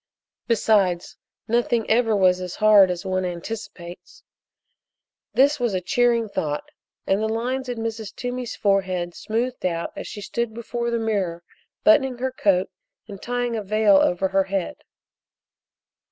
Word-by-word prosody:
Besides, 200 -6 +2 0.3
nothing 235 0 +1
ever 225 -1 +3
was 185 -2 +3
as 180 -1 -5
hard 210 -3 +6
as 180 +1 -4
one 185 0 -1
anticipates. 175 -1 -7 1.1
This 280 +3 +4
was 240 -5 0
a - - +1
cheering 235 +3 +1
thought, 150 -7 -3 0.4
and 195 +2 +1
the 220 - 0
lines 250 +4 -2
in 245 - -3
Mrs. 225 -2 -5
Toomey's 245 -1 -4
forehead 185 -3 0
smoothed 240 +6 -3
out 170 -2 -2
as - - -6
she 205 - -7
stood 235 +2 -3
before 235 +1 -3
the 235 - 0
mirror 195 -7 -2 0.4
buttoning 270 -5 +4
her 260 +1 -2
coat 195 -6 +1 0.4
and 200 -3 -10
tying 245 -1 -2
a 220 - -2
veil 210 0 +4
over 190 0 +2
her 195 0 +2
head. 190 -2 -3
215 Hz, 145 wpm, -23 LUFS, 185-235 Hz, 1.1 s, hard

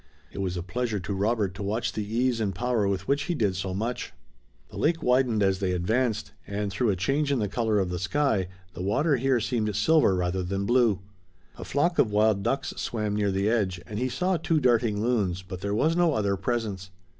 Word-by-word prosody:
It - - -8
was 95 -2 -2
a 85 - -3
pleasure 115 +3 -2
to 100 +3 -4
Robert 100 -1 0
to 95 - -8
watch 110 +4 -1
the 110 - -2
ease 120 +3 0
and 100 -4 -1
power 120 -1 0
with 95 -1 -2
which 140 +1 +1
he 175 - -1
did 105 -9 +1
so 95 0 -3
much. 115 +6 -3 0.6
The - - -9
lake 165 +1 +1
widened 125 -4 +3
as 95 -1 +2
they 95 -2 0
advanced, 110 +6 0 0.2
and 100 0 -3
through 115 +4 0
a 100 - +2
change 140 - 0
in 140 - +2
the 105 -3 0
color 110 +1 0
of 95 -3 0
the 90 - -3
sky 100 - +1 0.3
the 90 - -7
water 135 - +2
here 130 0 +2
seemed 110 -3 -1
silver 110 -1 +4
rather 90 +1 -1
than 95 +2 -2
blue. 120 -5 +3 0.5
A - - -8
flock 170 +5 0
of 110 - +4
wild 105 -1 +3
ducks 135 +7 -1
swam 105 -3 -2
near 105 -1 +1
the 95 +2 0
edge 100 -6 +1
and 105 -2 -5
he 130 +1 0
saw 180 +7 0
two 160 0 +1
darting 115 -5 +2
loons, 100 -7 0
but 90 -1 -8
there 100 0 -1
was 155 +9 +2
no 170 -4 +3
other 100 -2 +1
presence. 100 -4 -3
105 Hz, 220 wpm, -27 LUFS, 95-125 Hz, 0.6 s, silver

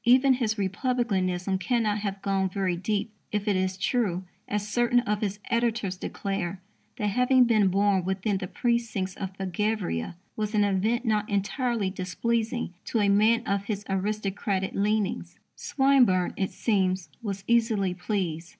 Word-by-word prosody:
Even 260 +3 +6
his 230 -4 0
republicanism 195 -3 0
cannot 215 +1 +1
have 200 -1 -4
gone 195 -1 +1
very 185 -1 -1
deep 205 +4 -2 0.2
if 210 0 -2
it 205 - +3
is 185 0 0
true, 190 -4 0 0.2
as 205 0 -2
certain 240 +2 +3
of 210 -3 -1
his 205 -1 -1
editors 230 -5 0
declare, 195 -1 -3 0.4
that 215 - -2
having 250 +4 +4
been 220 -4 +4
born 195 0 +2
within 190 +2 -1
the 185 - -4
precincts 225 -5 -1
of 190 -1 -6
Belgravia 190 - -2 0.2
"was 215 0 -2
an 210 - +4
event 210 +5 +1
not 215 -2 +1
entirely 205 +1 0
displeasing 225 +4 -2
to 230 - 0
a 205 -1 +3
man 220 +4 +4
of 200 0 -1
his 205 -1 -3
aristocratic 195 0 -1
leanings." 200 -4 -1 0.2
Swinburne, 260 -10 +3
it 190 - -1
seems, 190 -5 0
was 200 -3 -4
easily 225 -5 +2
pleased. 175 -3 -3
205 Hz, 150 wpm, -27 LUFS, 190-230 Hz, 0.4 s, Even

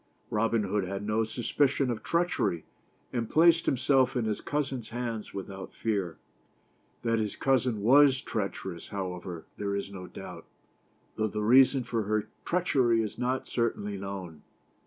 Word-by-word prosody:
Robin 115 +1 +2
Hood 100 +1 0
had 100 +2 -4
no 110 +1 +1
suspicion 130 +4 +1
of 110 -2 -4
treachery, 170 - 0 0.5
and 115 -3 -1
placed 165 +1 +5
himself 130 0 +3
in 120 -3 0
his 110 -1 -1
cousin's 135 -6 -2
hands 115 -2 -4
without 95 -1 -7
fear. 100 -7 -1 0.9
That 115 -1 +1
his 105 -2 -2
cousin 125 -5 +1
was 135 +2 +6
treacherous, 95 -7 -4
however, 90 -3 -5
there 100 -1 -2
is 100 0 -3
no 90 -2 -8
doubt, - - -9 0.7
though 110 - +1
the 105 0 -3
rea 130 +5 +8
son 130 -1 -2
for 115 -1 -1
her 105 0 0 0.2
treachery 130 -10 +2
is 110 - -6
not 125 +1 -1
certainly 105 -4 -1
known. 95 -5 -6
110 Hz, 150 wpm, -29 LUFS, 100-130 Hz, 0.9 s, rea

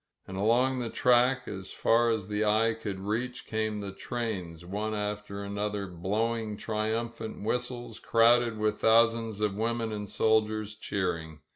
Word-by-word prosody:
And 95 - -7
along 120 +6 +2
the 120 -2 -2
track, 125 +1 +3
as 95 -2 -6
far 115 +1 +3
as 110 -4 -1
the 105 +1 0
eye 110 +2 +3
could 105 -3 -5
reach, 115 +5 -3
came 110 -1 -2
the 100 -1 -5
trains, 95 -6 -4
one 105 +4 -2
after 105 -1 -4
another, 100 0 -2
blowing 105 +5 -2
triumphant 110 +1 -3
whistles, 120 +2 -3
crowded 115 0 +4
with 105 0 0
thousands 115 -1 +3
of 105 -2 +1
women 115 +1 -1
and 105 -1 -5
soldiers 110 -1 +1
cheering. 85 -7 -3
110 Hz, 145 wpm, -29 LUFS, 105-115 Hz, -, crowded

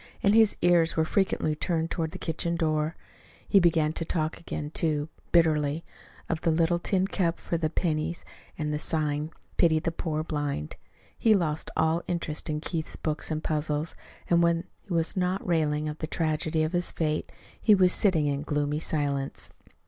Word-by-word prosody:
And 200 - +5
his 220 -1 +5
ears 170 -2 +4
were 160 - +3
frequently 160 -4 +1
turned 165 +1 -1
toward 160 -2 -1
the - - -8
kitchen 170 +1 -2
door. 155 -1 0 0.5
He 200 - +6
began 160 -3 +3
to 165 - -2
talk 160 -1 -1
again, 150 -3 -5
too, 155 -2 0 0.2
bitterly, 155 -2 +3 0.4
of 160 -2 -2
the - - +1
little 165 +1 +2
tin 190 +1 +1
cup 180 -4 0
for - - -3
the 160 -2 0
pennies 165 0 -1 0.3
and 150 -1 -2
the 150 - -1
sign 150 -1 -1 0.3
"Pity 165 -3 +4
the 165 +1 -1
Poor 155 -2 -2
Blind." 145 - -3 0.4
He 220 -2 +5
lost 155 -5 -1
all 160 +1 +2
interest 170 -4 -2
in 150 0 -2
Keith's 160 -1 -3
books 155 -1 -3
and 155 -1 -2
puzzles, 150 0 -1 0.3
and 170 0 +4
when 170 0 +2 0.2
he - - -12
was 165 -1 +1
not 185 +1 0
railing 155 -3 +1
at 150 0 -5
the 155 - -3
tragedy 155 0 0
of 155 +3 -2
his 175 0 +1
fate, 155 -2 -1 0.3
he 215 - +6
was 185 -2 +5
sitting 175 -7 +3
in 140 -1 0
gloomy 150 0 -1
silence. 140 -4 0
160 Hz, 180 wpm, -27 LUFS, 150-170 Hz, 0.5 s, He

